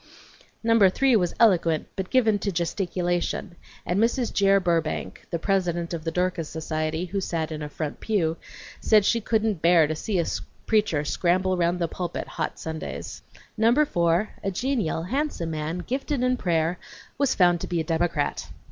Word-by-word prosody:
Number 230 Hz, -4 st, +5 dB
three 260 Hz, +6 st, +3 dB
was 180 Hz, -5 st, +1 dB
eloquent 170 Hz, -8 st, +3 dB
but 190 Hz, -2 st, -4 dB
given 220 Hz, -5 st, +3 dB
to 200 Hz, -, -2 dB
gesticulation, 175 Hz, +1 st, -2 dB, 0.3 s
and 180 Hz, +3 st, 0 dB
Mrs. 235 Hz, +2 st, +1 dB
Jere 195 Hz, 0 st, +4 dB
Burbank, 165 Hz, -4 st, -2 dB
the 170 Hz, -, -1 dB
president 175 Hz, -2 st, -1 dB
of 165 Hz, -2 st, -4 dB
the 165 Hz, -, -1 dB
Dorcas 180 Hz, -2 st, -1 dB
Society, 155 Hz, +1 st, -2 dB
who 195 Hz, +2 st, -3 dB
sat 165 Hz, -3 st, -2 dB
in 155 Hz, 0 st, -5 dB
a 150 Hz, -, -5 dB
front 150 Hz, 0 st, -5 dB
pew, 165 Hz, -7 st, 0 dB, 0.4 s
said 215 Hz, -3 st, +4 dB
she 230 Hz, +2 st, +2 dB
couldn't 215 Hz, -5 st, 0 dB
bear 170 Hz, -1 st, +5 dB
to 155 Hz, +1 st, -2 dB
see 195 Hz, +5 st, -2 dB
a 170 Hz, -, +1 dB, 0.4 s
preacher 205 Hz, -9 st, +1 dB
scramble 185 Hz, +4 st, +1 dB
round 175 Hz, 0 st, +1 dB
the 170 Hz, -1 st, 0 dB
pulpit 175 Hz, +1 st, -4 dB
hot -, -, -4 dB
Sundays. 160 Hz, -1 st, -6 dB, 0.3 s
Number 235 Hz, +7 st, +4 dB
four, 170 Hz, -, +1 dB
a 195 Hz, -, 0 dB
genial, 210 Hz, -, -1 dB
handsome 250 Hz, -, -2 dB
man, 160 Hz, +3 st, -3 dB
gifted 270 Hz, +1 st, -2 dB
in 255 Hz, 0 st, +2 dB
prayer, 170 Hz, -5 st, 0 dB, 0.4 s
was 280 Hz, -2 st, +2 dB
found 175 Hz, -2 st, +4 dB
to -, -, -4 dB
be 175 Hz, -, -1 dB
a -, -, 0 dB
Democrat. 160 Hz, -2 st, -1 dB
180 Hz, 170 wpm, -25 LUFS, 165-210 Hz, 0.4 s, Number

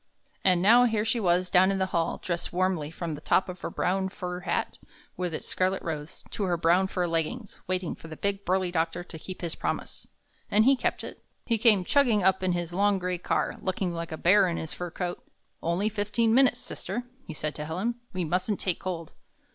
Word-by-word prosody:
And 180 Hz, -2 st, +3 dB
now 235 Hz, +5 st, +7 dB
here 220 Hz, -2 st, +1 dB
she 225 Hz, +1 st, +1 dB
was 180 Hz, -2 st, +2 dB
down 185 Hz, +1 st, +6 dB
in 195 Hz, -, +1 dB
the 190 Hz, -, +1 dB
hall, 170 Hz, -1 st, +1 dB
dressed 170 Hz, -1 st, -2 dB
warmly 180 Hz, -4 st, 0 dB
from 165 Hz, 0 st, -5 dB
the 150 Hz, -, -7 dB
top 190 Hz, -, +2 dB
of 180 Hz, -1 st, -8 dB
her -, -, -3 dB
brown 190 Hz, +1 st, 0 dB
fur 180 Hz, -2 st, -5 dB
hat, 180 Hz, -, -2 dB, 0.4 s
with 180 Hz, -1 st, -2 dB
its 155 Hz, -, -5 dB
scarlet 185 Hz, +1 st, 0 dB
rose, 155 Hz, -2 st, -5 dB
to -, -, -5 dB
her 175 Hz, -2 st, +1 dB
brown 175 Hz, +3 st, +3 dB
fur 180 Hz, -2 st, -1 dB
leggings, 170 Hz, +7 st, -3 dB
waiting 185 Hz, -2 st, -1 dB
for -, -, -12 dB
the 155 Hz, -1 st, -9 dB
big, 200 Hz, 0 st, -1 dB
burly 185 Hz, -1 st, +1 dB
doctor 170 Hz, +1 st, -1 dB
to 165 Hz, -2 st, -10 dB
keep 185 Hz, +3 st, -8 dB
his 170 Hz, -2 st, -3 dB
promise. -, -, -4 dB, 0.4 s
And 215 Hz, +2 st, +4 dB
he 270 Hz, +1 st, +6 dB
kept 250 Hz, -, -1 dB
it. -, -, -9 dB, 0.2 s
He 230 Hz, -2 st, +1 dB
came 210 Hz, -5 st, +5 dB
chugging 240 Hz, -7 st, +3 dB
up 190 Hz, 0 st, +3 dB
in 185 Hz, -1 st, +1 dB
his 175 Hz, -1 st, -3 dB
long 200 Hz, +2 st, +3 dB
gray 180 Hz, -1 st, -2 dB
car, -, -, -1 dB
looking 185 Hz, -1 st, -1 dB
like 170 Hz, 0 st, -5 dB
a 160 Hz, -, -4 dB
bear 190 Hz, +3 st, +5 dB
in 170 Hz, -, -2 dB
his 160 Hz, +3 st, -5 dB
fur 180 Hz, -2 st, -5 dB
coat. 175 Hz, +1 st, -4 dB, 0.4 s
"Only 175 Hz, +5 st, 0 dB
fifteen 220 Hz, +2 st, +1 dB
minutes, 255 Hz, -1 st, +5 dB
sister," 230 Hz, 0 st, -5 dB, 0.2 s
he 160 Hz, -, -6 dB
said 150 Hz, 0 st, -2 dB
to 150 Hz, +1 st, -6 dB
Helen. 185 Hz, +10 st, -1 dB, 0.2 s
"We 185 Hz, -3 st, -2 dB
mustn't 185 Hz, +5 st, 0 dB
take 185 Hz, -3 st, 0 dB
cold. 170 Hz, -4 st, -5 dB
185 Hz, 220 wpm, -28 LUFS, 170-200 Hz, 0.4 s, now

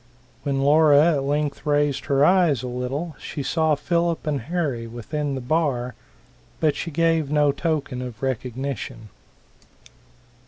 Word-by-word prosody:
When 135 Hz, 0 st, -1 dB
Laura 150 Hz, +2 st, +5 dB
at 140 Hz, -, 0 dB
length 145 Hz, +1 st, -1 dB
raised 145 Hz, -2 st, +1 dB
her 140 Hz, 0 st, +3 dB
eyes 170 Hz, -9 st, +3 dB
a -, -, -3 dB
little, 135 Hz, +6 st, -4 dB
she 145 Hz, -, -5 dB
saw 160 Hz, +1 st, +2 dB
Philip 170 Hz, +3 st, -1 dB
and 145 Hz, -4 st, -1 dB
Harry 140 Hz, -5 st, -2 dB
within 140 Hz, +5 st, -4 dB
the 130 Hz, -, -4 dB
bar, 125 Hz, -3 st, 0 dB, 0.7 s
but 155 Hz, -2 st, +2 dB
she 170 Hz, -, -4 dB
gave 165 Hz, -1 st, +1 dB
no 150 Hz, -1 st, +3 dB
token 145 Hz, -4 st, -2 dB
of 125 Hz, -1 st, -8 dB
recognition. 130 Hz, -3 st, -4 dB
145 Hz, 135 wpm, -23 LUFS, 130-155 Hz, 0.7 s, Laura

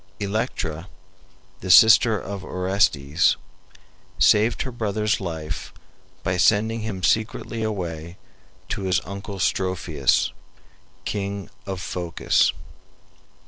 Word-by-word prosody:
Electra, 100 Hz, -6 st, -3 dB, 0.7 s
the 95 Hz, -, -7 dB
sister 110 Hz, +2 st, +7 dB
of 100 Hz, 0 st, -6 dB
Orestes, 90 Hz, -6 st, +1 dB, 0.8 s
saved 110 Hz, +3 st, +4 dB
her 130 Hz, -, -5 dB
brother's 110 Hz, -2 st, -1 dB
life 80 Hz, -3 st, -5 dB, 0.5 s
by 90 Hz, +1 st, 0 dB
sending 110 Hz, +5 st, +3 dB
him 105 Hz, -4 st, -5 dB
secretly 110 Hz, +2 st, 0 dB
away 85 Hz, -5 st, -4 dB, 0.5 s
to -, -, -3 dB
his 95 Hz, -1 st, +1 dB
uncle 100 Hz, 0 st, -7 dB
Strophius, 90 Hz, -6 st, +1 dB, 0.7 s
King 100 Hz, -1 st, -4 dB, 0.2 s
of 95 Hz, -1 st, -4 dB
Phocis. 90 Hz, -2 st, +1 dB
95 Hz, 95 wpm, -23 LUFS, 90-110 Hz, 0.8 s, sister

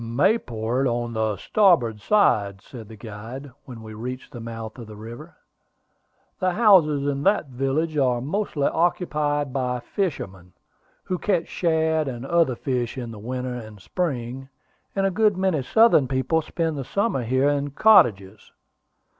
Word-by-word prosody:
"Mayport 120 Hz, -, 0 dB
on 120 Hz, -1 st, -2 dB
the 110 Hz, -2 st, -1 dB
starboard 130 Hz, -, +2 dB
hand," 100 Hz, -, +2 dB
said 115 Hz, -5 st, -11 dB
the 110 Hz, -, -11 dB
guide, 115 Hz, +6 st, -9 dB
when 120 Hz, -4 st, -10 dB
we 110 Hz, -, -9 dB
had 105 Hz, -, -10 dB
reached 125 Hz, +3 st, -6 dB
the 125 Hz, -, -8 dB
mouth 115 Hz, 0 st, -7 dB
of 115 Hz, -, -9 dB
the 105 Hz, -, -10 dB
river. 120 Hz, +10 st, -10 dB, 1.0 s
"The 185 Hz, -1 st, +1 dB
houses 175 Hz, -10 st, +4 dB
in 140 Hz, -1 st, -1 dB
that 195 Hz, -4 st, +2 dB
village 135 Hz, +5 st, -1 dB
are 125 Hz, -3 st, +2 dB
mostly 150 Hz, -, -2 dB
occupied 150 Hz, -5 st, 0 dB
by 125 Hz, -2 st, -1 dB
fishermen, 95 Hz, -, -4 dB, 0.5 s
who 180 Hz, -1 st, -3 dB
catch 185 Hz, -5 st, 0 dB
shad 160 Hz, -2 st, 0 dB
and 125 Hz, -1 st, -5 dB
other 165 Hz, -4 st, +2 dB
fish 125 Hz, 0 st, -2 dB
in 120 Hz, -3 st, -5 dB
the 110 Hz, -, -9 dB
winter 125 Hz, +3 st, -4 dB
and 110 Hz, -4 st, -9 dB
spring, 135 Hz, -, -4 dB, 0.5 s
and 195 Hz, 0 st, +1 dB
a 195 Hz, -, +2 dB
good 210 Hz, 0 st, +2 dB
many 185 Hz, -6 st, +1 dB
southern 220 Hz, -, +4 dB
people 130 Hz, +5 st, 0 dB
spend 160 Hz, -2 st, -2 dB
the -, -, -3 dB
summer 200 Hz, -, -1 dB
here 130 Hz, +4 st, +2 dB
in 145 Hz, 0 st, -1 dB
cottages." 110 Hz, -, +3 dB
135 Hz, 155 wpm, -24 LUFS, 115-165 Hz, 1.0 s, houses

